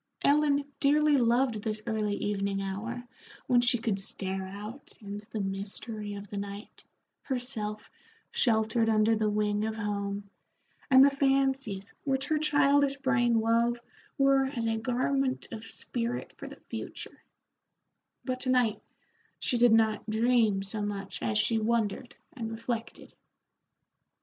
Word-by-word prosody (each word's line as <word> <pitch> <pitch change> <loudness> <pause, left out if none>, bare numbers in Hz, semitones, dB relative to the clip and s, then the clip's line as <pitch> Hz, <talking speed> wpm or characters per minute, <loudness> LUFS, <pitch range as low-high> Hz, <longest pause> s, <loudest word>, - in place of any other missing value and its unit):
Ellen 285 -1 +3
dearly 300 +1 +4
loved 240 -2 +2
this 215 0 -3
early 215 -3 -1
evening 200 -1 -1
hour 215 +5 -4 0.4
when 245 -1 +4
she 240 0 +3
could 220 -4 -1
stare 190 0 -3
out 210 +8 -9
into 205 +1 -8
the 220 - -4
mystery 205 +2 -4
of 200 0 -8
the 205 - -6
night, 200 +1 -8 0.4
herself 235 -5 -4 0.4
sheltered 225 -1 +2
under 220 +1 +4
the 215 -1 +1
wing 210 0 0
of 220 0 -2
home, 200 -1 -3 0.6
and 265 0 +8
the 280 - +4
fancies 270 -7 0
which 270 -2 0
her 310 -1 +2
childish 285 -2 +3
brain 240 -4 +2
wove 230 +2 +2 0.4
were 275 -1 +4
as 260 -4 -3
a 225 0 +1
garment 260 +3 0
of 225 -1 -7
spirit 240 +1 -4
for - - -8
the - - -11
future; - - -7 1.0
but 255 -1 -2
to 255 - -3
night 245 -4 +2 0.6
she 245 - 0
did 240 -1 +6
not 220 -1 +3
dream 220 -3 +3
so 205 +2 -2
much 200 -1 -4
as 110 -2 0
she 220 - +2
wondered 225 +1 -1 0.2
and 230 -3 -5
reflected. 230 0 -5
225 Hz, 140 wpm, -29 LUFS, 210-255 Hz, 1.0 s, and